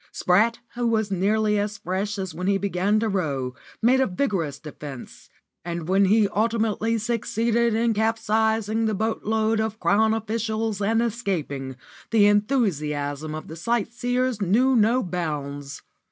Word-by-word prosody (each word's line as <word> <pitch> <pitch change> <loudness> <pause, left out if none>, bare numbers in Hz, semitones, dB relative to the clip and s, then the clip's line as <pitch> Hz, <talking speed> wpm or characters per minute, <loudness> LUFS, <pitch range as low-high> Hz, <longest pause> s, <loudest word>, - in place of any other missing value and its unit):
Spratt, 215 +6 +2 0.2
who 240 0 -1
was 220 -3 0
nearly 210 +3 +1
as 205 0 -2
fresh 200 +1 -3
as 190 -2 -4
when 180 +1 -4
he 200 0 +3
began 200 +2 +1
to 225 - +1
row, 140 -11 -1 0.3
made 255 +3 +5
a 265 - +3
vigorous 180 - -1
defence, 145 -4 -10 0.3
and 170 -2 -4
when 195 +2 +4
he 210 +2 +4
ultimately 225 +1 0
succeeded 230 0 0
in 230 0 +2
capsizing 220 0 +1
the 215 -1 0
boatload 220 +1 0
of 220 0 -2
Crown 220 +2 +3
officials 220 -1 -2
and 225 +3 +2
escaping, 170 - -3 0.3
the 220 -3 +4
enthusiasm 155 - 0
of 155 - -7
the 160 - -8
sightseers 240 +4 -1
knew 240 +8 +3
no 230 +3 +3
bounds. 145 -6 -4
210 Hz, 140 wpm, -24 LUFS, 180-225 Hz, 0.3 s, made